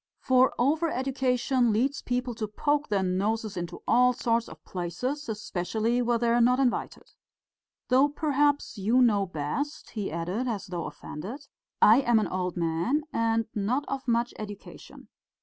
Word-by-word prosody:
For 260 Hz, 0 st, +3 dB
over 310 Hz, +7 st, +2 dB
education 255 Hz, -2 st, +1 dB
leads 265 Hz, +6 st, 0 dB
people 250 Hz, 0 st, -2 dB
to 220 Hz, -1 st, -4 dB
poke 290 Hz, +7 st, 0 dB
their 200 Hz, -2 st, +1 dB
noses 205 Hz, +4 st, -1 dB
into 175 Hz, -1 st, -6 dB
all 250 Hz, +1 st, +5 dB
sorts 230 Hz, -1 st, 0 dB
of -, -, -14 dB
places, 230 Hz, -, -4 dB
especially 215 Hz, +3 st, -1 dB
where 240 Hz, -1 st, +1 dB
they 235 Hz, 0 st, 0 dB
are 240 Hz, +1 st, +3 dB
not 250 Hz, +2 st, +4 dB
invited. 255 Hz, -3 st, -1 dB, 0.8 s
Though 265 Hz, +3 st, +5 dB
perhaps 290 Hz, -4 st, 0 dB
you 225 Hz, +6 st, +3 dB
know 205 Hz, -5 st, +3 dB
best," 180 Hz, -, -4 dB
he 205 Hz, -6 st, -4 dB
added, 180 Hz, +10 st, -2 dB
as 210 Hz, -5 st, -3 dB
though 180 Hz, -3 st, -4 dB
offended. 195 Hz, -, -8 dB, 0.4 s
"I 220 Hz, +3 st, +8 dB
am 240 Hz, -3 st, +3 dB
an 215 Hz, -, +1 dB
old 180 Hz, -1 st, -3 dB
man 170 Hz, -, 0 dB
and 225 Hz, 0 st, +1 dB
not 235 Hz, +8 st, -1 dB
of 270 Hz, -1 st, -4 dB
much 235 Hz, 0 st, +1 dB
education. 205 Hz, -2 st, -10 dB
235 Hz, 155 wpm, -27 LUFS, 200-260 Hz, 0.8 s, I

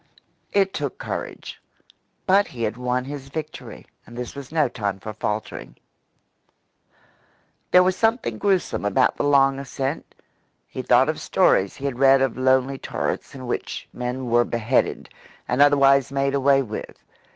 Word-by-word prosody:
It 195 Hz, -1 st, +2 dB
took 145 Hz, -3 st, -4 dB
courage; -, -, -6 dB, 0.6 s
but 200 Hz, +2 st, +4 dB
he 120 Hz, -3 st, -6 dB
had 110 Hz, 0 st, -1 dB
won 125 Hz, 0 st, -2 dB
his 135 Hz, -1 st, -8 dB
victory 155 Hz, +2 st, -7 dB, 0.2 s
and 120 Hz, -, -12 dB
this 125 Hz, -1 st, -5 dB
was 140 Hz, -1 st, -9 dB
no 155 Hz, -3 st, +2 dB
time 100 Hz, -5 st, -4 dB
for 110 Hz, +2 st, -7 dB
faltering. 105 Hz, 0 st, -5 dB, 1.9 s
There 180 Hz, -, +6 dB
was 185 Hz, 0 st, +1 dB
something 225 Hz, -, 0 dB
gruesome 190 Hz, -, 0 dB
about 105 Hz, -1 st, +2 dB
the -, -, -1 dB
long 135 Hz, -1 st, +3 dB
ascent. 135 Hz, +2 st, -5 dB, 0.5 s
He -, -, -6 dB
thought -, -, +4 dB
of -, -, -2 dB
stories 95 Hz, 0 st, +2 dB
he 140 Hz, -, -8 dB
had 130 Hz, -3 st, -3 dB
read 135 Hz, 0 st, +6 dB
of 135 Hz, -, -1 dB
lonely 130 Hz, +1 st, +1 dB
turrets -, -, -4 dB
in 130 Hz, -1 st, -8 dB
which 120 Hz, -, -4 dB
men 125 Hz, +1 st, -4 dB
were 120 Hz, 0 st, +3 dB
beheaded, 115 Hz, +2 st, 0 dB, 0.4 s
and 125 Hz, -, +1 dB
otherwise 140 Hz, -2 st, +5 dB
made 140 Hz, 0 st, 0 dB
away 135 Hz, 0 st, +3 dB
with. 110 Hz, -3 st, -8 dB
135 Hz, 150 wpm, -23 LUFS, 125-140 Hz, 1.9 s, There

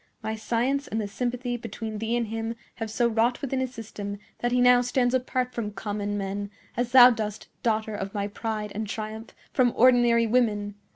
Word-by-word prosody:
My 220 Hz, -, -2 dB
science 240 Hz, +6 st, 0 dB
and 220 Hz, -, -2 dB
the 210 Hz, -, -2 dB
sympathy 245 Hz, +3 st, -2 dB
between 220 Hz, -2 st, -6 dB
thee 225 Hz, +2 st, 0 dB
and 235 Hz, -, 0 dB
him 225 Hz, +1 st, -3 dB, 0.2 s
have 225 Hz, -1 st, -4 dB
so 235 Hz, +2 st, +2 dB
wrought 235 Hz, +2 st, +1 dB
within 270 Hz, -2 st, -2 dB
his 260 Hz, -1 st, -2 dB
system 210 Hz, -4 st, -6 dB, 0.2 s
that 240 Hz, -, 0 dB
he 250 Hz, -, +2 dB
now 245 Hz, 0 st, +6 dB
stands 245 Hz, 0 st, +1 dB
apart 255 Hz, 0 st, 0 dB
from 225 Hz, -3 st, -3 dB
common 205 Hz, 0 st, -3 dB
men, 200 Hz, +1 st, -3 dB, 0.3 s
as 245 Hz, 0 st, -1 dB
thou 250 Hz, -1 st, +10 dB
dost, 215 Hz, -3 st, -4 dB
daughter 220 Hz, -1 st, 0 dB
of 195 Hz, -1 st, -4 dB
my 200 Hz, 0 st, -2 dB
pride 215 Hz, 0 st, -4 dB
and 215 Hz, +1 st, -3 dB
triumph, 220 Hz, +1 st, -6 dB, 0.2 s
from 245 Hz, -3 st, +3 dB
ordinary 240 Hz, -1 st, +5 dB
women. 215 Hz, -3 st, +1 dB
225 Hz, 190 wpm, -26 LUFS, 215-245 Hz, 0.3 s, thou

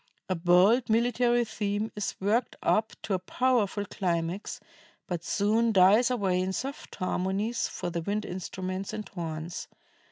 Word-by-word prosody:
A 185 Hz, -, +1 dB
bold 185 Hz, +8 st, +4 dB
military 240 Hz, +1 st, +3 dB
theme 210 Hz, 0 st, -2 dB
is 205 Hz, -1 st, -3 dB
worked 220 Hz, +5 st, +1 dB
up 220 Hz, 0 st, +2 dB
to 205 Hz, -, -2 dB
a 185 Hz, -, +1 dB
powerful 210 Hz, 0 st, +1 dB
climax, 175 Hz, -1 st, -2 dB, 0.5 s
but 175 Hz, -2 st, -4 dB
soon 220 Hz, +5 st, +2 dB
dies 205 Hz, +5 st, +6 dB
away 195 Hz, -7 st, +1 dB
in 190 Hz, +1 st, -1 dB
soft 275 Hz, +7 st, -5 dB
harmonies 195 Hz, +5 st, -1 dB
for 175 Hz, -, -5 dB
the 170 Hz, 0 st, -2 dB
wind 205 Hz, +4 st, -2 dB
instruments 185 Hz, +1 st, -4 dB
and 210 Hz, -1 st, -5 dB
horns. 165 Hz, -1 st, -5 dB
200 Hz, 140 wpm, -28 LUFS, 185-225 Hz, 0.5 s, dies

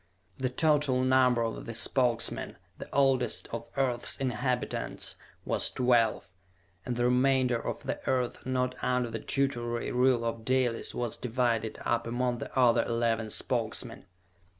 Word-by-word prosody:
The 130 Hz, -1 st, 0 dB
total 145 Hz, -2 st, +2 dB
number 130 Hz, -2 st, +4 dB
of 115 Hz, -, -4 dB
the 115 Hz, -, -3 dB
Spokesmen, 120 Hz, 0 st, +1 dB, 0.2 s
the -, -, -8 dB
oldest 135 Hz, -2 st, +2 dB
of 115 Hz, 0 st, -5 dB
earth's 125 Hz, -3 st, -1 dB
inhabitants, 125 Hz, -1 st, -2 dB, 0.3 s
was -, -, +2 dB
twelve, 120 Hz, -5 st, +2 dB, 0.6 s
and 125 Hz, -, -1 dB
the 120 Hz, 0 st, +1 dB
remainder 125 Hz, -1 st, +2 dB
of -, -, -4 dB
the -, -, -3 dB
Earth 125 Hz, -2 st, -1 dB
not 125 Hz, 0 st, 0 dB
under 125 Hz, -2 st, 0 dB
the 110 Hz, -, -3 dB
tutelary 120 Hz, -3 st, -1 dB
rule 125 Hz, -1 st, +3 dB
of 115 Hz, -1 st, -3 dB
Dalis 130 Hz, -2 st, 0 dB
was 120 Hz, -3 st, -2 dB
divided 120 Hz, -2 st, -1 dB
up 115 Hz, 0 st, 0 dB
among 120 Hz, 0 st, -1 dB
the -, -, -5 dB
other 125 Hz, -3 st, +5 dB
eleven 115 Hz, -1 st, 0 dB
Spokesmen. -, -, -2 dB
125 Hz, 140 wpm, -29 LUFS, 115-130 Hz, 0.6 s, other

